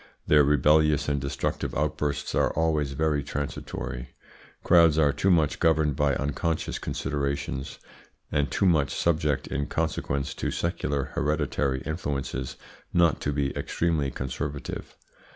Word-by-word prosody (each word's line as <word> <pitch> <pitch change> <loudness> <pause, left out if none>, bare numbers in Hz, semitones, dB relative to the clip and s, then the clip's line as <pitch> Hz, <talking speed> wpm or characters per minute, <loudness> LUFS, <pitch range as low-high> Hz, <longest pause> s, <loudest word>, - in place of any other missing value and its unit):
Their 75 -1 +6
rebellious 75 +1 +4
and 70 -1 0
destructive 70 0 -2
outbursts 75 -1 -1
are - - +2
always 75 -3 +1
very 75 0 +1
transitory. 65 -3 -5 0.5
Crowds 85 -3 +6
are 75 -3 +4
too 85 +7 +1
much 80 -5 +3
governed 80 -3 +3
by 70 -1 +2
unconscious 75 +3 -2
considerations, 70 -1 -3 0.5
and 70 -1 +1
too 100 - +1
much 80 -6 +3
subject 75 -4 +1
in 70 - -2
consequence 70 +1 -2
to - - -3
secular 70 -5 -2
hereditary 75 -3 0
influences 70 -4 -3 0.4
not 85 -3 +3
to 70 - -1
be 70 -1 -1
extremely 80 -5 0
conservative. 70 +2 -5
75 Hz, 125 wpm, -27 LUFS, 70-80 Hz, 0.5 s, Their